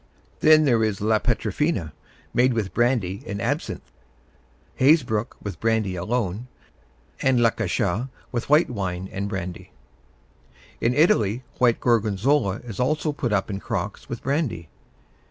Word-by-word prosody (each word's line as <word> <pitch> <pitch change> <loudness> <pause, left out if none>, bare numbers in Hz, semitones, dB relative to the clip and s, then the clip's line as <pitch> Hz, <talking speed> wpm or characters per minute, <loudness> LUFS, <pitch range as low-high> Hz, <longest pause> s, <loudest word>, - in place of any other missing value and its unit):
Then 155 0 +6
there 120 -5 +3
is 105 -3 -1
la 110 +1 +2
Petafina, 110 - -1 0.4
made 125 +1 +3
with 110 -5 -2
brandy 120 -6 +1
and 100 - -4
absinthe; - - -3 0.9
Hazebrook 130 -6 +3
with 100 -4 -6
brandy 110 -4 0
alone; 105 +3 -2 0.7
and 130 -2 +3
la 115 -1 +4
Cachat 105 +3 -1 0.2
with 120 +1 -3
white 150 -1 +4
wine 95 -4 -3
and 100 +1 -3
brandy. 90 -3 -5 1.1
In 120 +2 +2
Italy 120 - +3 0.2
white 120 -2 +3
Gorgonzola 110 0 +1
is 115 -5 -8
also 150 +4 +1
put 140 -5 -3
up 105 0 0
in 95 - -3
crocks 100 0 -4
with 120 - -6
brandy. 135 - -1
115 Hz, 135 wpm, -24 LUFS, 100-125 Hz, 1.1 s, Then